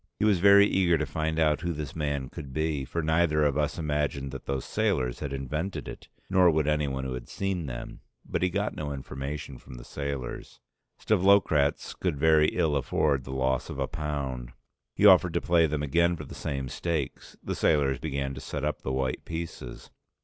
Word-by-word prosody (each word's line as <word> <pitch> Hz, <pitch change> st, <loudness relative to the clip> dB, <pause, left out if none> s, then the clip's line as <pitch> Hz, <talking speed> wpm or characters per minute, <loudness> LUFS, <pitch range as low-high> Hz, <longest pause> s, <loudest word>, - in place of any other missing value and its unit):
He -, -, +1 dB
was 100 Hz, -4 st, +4 dB
very 100 Hz, +2 st, +7 dB
eager 90 Hz, -4 st, +3 dB
to 80 Hz, -, -1 dB
find 80 Hz, +3 st, -2 dB
out 75 Hz, -2 st, +2 dB
who 85 Hz, -1 st, -1 dB
this 75 Hz, -3 st, -6 dB
man 70 Hz, -4 st, -2 dB
could 75 Hz, -5 st, -8 dB
be, 75 Hz, -1 st, -1 dB
for 85 Hz, +5 st, -3 dB
neither 80 Hz, -1 st, +2 dB
of 70 Hz, -2 st, +2 dB
us 75 Hz, +1 st, 0 dB
imagined 75 Hz, -3 st, -1 dB
that 65 Hz, -, -9 dB
those 70 Hz, -1 st, -2 dB
sailors 60 Hz, -1 st, 0 dB
had 75 Hz, -2 st, -4 dB
invented 75 Hz, +8 st, -3 dB
it, -, -, -9 dB, 0.2 s
nor 90 Hz, -2 st, +5 dB
would 80 Hz, -2 st, +1 dB
anyone 70 Hz, -3 st, 0 dB
who 65 Hz, -1 st, -3 dB
had 60 Hz, -1 st, -7 dB
seen 95 Hz, -5 st, -2 dB
them. -, -, -7 dB, 0.3 s
But -, -, -2 dB
he 90 Hz, -, +2 dB
got 100 Hz, +3 st, -1 dB
no 75 Hz, -2 st, -4 dB
information 70 Hz, 0 st, -6 dB
from 65 Hz, -, -12 dB
the -, -, -9 dB
sailors. 70 Hz, -1 st, -5 dB, 0.4 s
Stavlokratz 95 Hz, -8 st, +3 dB
could 90 Hz, -6 st, -2 dB
very 80 Hz, +1 st, +5 dB
ill 80 Hz, -4 st, +1 dB
afford 70 Hz, 0 st, +1 dB
the 65 Hz, -, -7 dB
loss 65 Hz, -1 st, 0 dB
of -, -, -6 dB
a -, -, 0 dB
pound. 70 Hz, -5 st, -4 dB, 0.4 s
He 105 Hz, -, +2 dB
offered 90 Hz, -4 st, +7 dB
to -, -, +2 dB
play 85 Hz, -1 st, +3 dB
them 75 Hz, -1 st, -2 dB
again 85 Hz, +4 st, +2 dB
for 75 Hz, -3 st, -8 dB
the -, -, -10 dB
same 70 Hz, -2 st, -3 dB
stakes. 80 Hz, 0 st, -4 dB
The -, -, -3 dB
sailors 70 Hz, -4 st, +2 dB
began 70 Hz, -3 st, -3 dB
to 65 Hz, -, -8 dB
set 75 Hz, -1 st, -4 dB
up 75 Hz, -, -2 dB
the 65 Hz, -, -3 dB
white 65 Hz, -1 st, -1 dB
pieces. 85 Hz, 0 st, -7 dB
75 Hz, 200 wpm, -28 LUFS, 70-85 Hz, 0.4 s, very